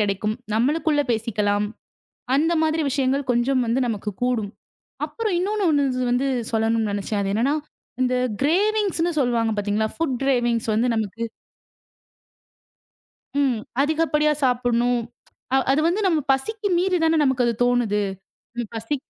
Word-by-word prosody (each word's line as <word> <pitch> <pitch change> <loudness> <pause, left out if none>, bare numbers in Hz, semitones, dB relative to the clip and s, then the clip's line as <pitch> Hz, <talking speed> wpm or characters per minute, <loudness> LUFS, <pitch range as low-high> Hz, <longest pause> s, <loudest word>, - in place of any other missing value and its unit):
கிடைக்கும். 210 +1 0 0.2
நம்மளுக்குள்ள 295 +6 +2
பேசிக்கலாம். 210 -2 0 0.7
அந்த 315 +5 +2
மாதிரி 315 0 +1
விஷயங்கள் 270 0 0
கொஞ்சம் 250 +2 +2 0.2
நமக்குக் 210 -3 -4
கூடும். 235 -5 0 0.6
அப்புறம் 440 -4 -2
இன்னொன்னு 405 +3 -1
ஒண்ணு 290 -2 +3 0.3
வந்து 250 +3 +1 0.3
சொல்லணும்னு 225 -1 +1
நெனைச்சேன். 205 +1 -2
அது 195 - -1
என்னன்னா 250 +7 +2 0.5
இந்த 255 0 +1 0.3
க்ரேவின்ங்ஸ்ன்னு 375 +2 +1
சொல்லுவாங்க 235 -3 +1
பாத்தீங்களா. 205 +1 0
ஃபுட்க்ரேவின்ங்ஸ் 250 -6 0
வந்து 235 +3 +2
நமக்கு 220 +1 -2 2.2
ம். 260 -5 +2 0.2
அதிகப்படியா 305 0 +2
சாப்புட்ணும். 245 -1 +2 0.5
அ - - +5
அது 275 +3 +3
வந்து 365 +5 0
நம்ம 335 -4 +3
பசிக்கு 410 +10 -2
மீறித்தானே 345 -3 +2
நமக்கு 265 -2 +2
அது 235 - +1
தோணுது. 240 -4 +1 0.7
பசி 225 +6 -2
250 Hz, 115 wpm, -23 LUFS, 225-310 Hz, 2.2 s, அ